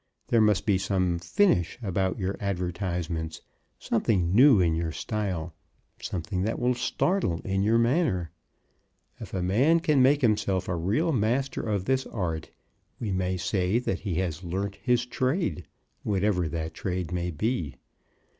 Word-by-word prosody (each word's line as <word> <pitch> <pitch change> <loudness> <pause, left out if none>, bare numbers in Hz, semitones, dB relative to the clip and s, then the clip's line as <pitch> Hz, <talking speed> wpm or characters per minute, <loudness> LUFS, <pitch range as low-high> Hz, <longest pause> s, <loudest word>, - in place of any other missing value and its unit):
There 115 - +4
must 105 -2 +3
be 100 -3 +2
some 95 -3 0
finish 90 - +2
about 95 -1 0
your 95 -1 -2
advertisements, 90 -4 -3 0.4
something 95 -6 0
new 125 0 +7
in 85 -3 +3
your 80 0 -1
style, 90 - -3 0.5
something 90 +1 -3
that 110 +4 -1
will 125 +1 +2
startle 125 - 0
in 95 0 -1
your 110 +3 +3
manner. 115 - +1 0.9
If - - -8
a 90 - -1
man 130 - +3
can 155 -5 +3
make 140 +3 +4
himself 100 -5 +1
a 90 - -1
real 105 - +1
master 125 +2 0
of 100 -4 -2
this 130 0 0
art, 85 -6 -3 0.5
we 110 -4 -3
may 95 0 -1
say 95 +2 0
that 120 -6 -1
he 95 -5 -3
has 90 -1 -2
learnt 95 +3 -3
his 125 -1 +1
trade, 130 - -1 0.3
whatever 100 -3 +1
that 80 0 -4
trade 90 -2 -3
may 90 -1 -2
be. 85 - -2
95 Hz, 150 wpm, -27 LUFS, 90-115 Hz, 0.9 s, new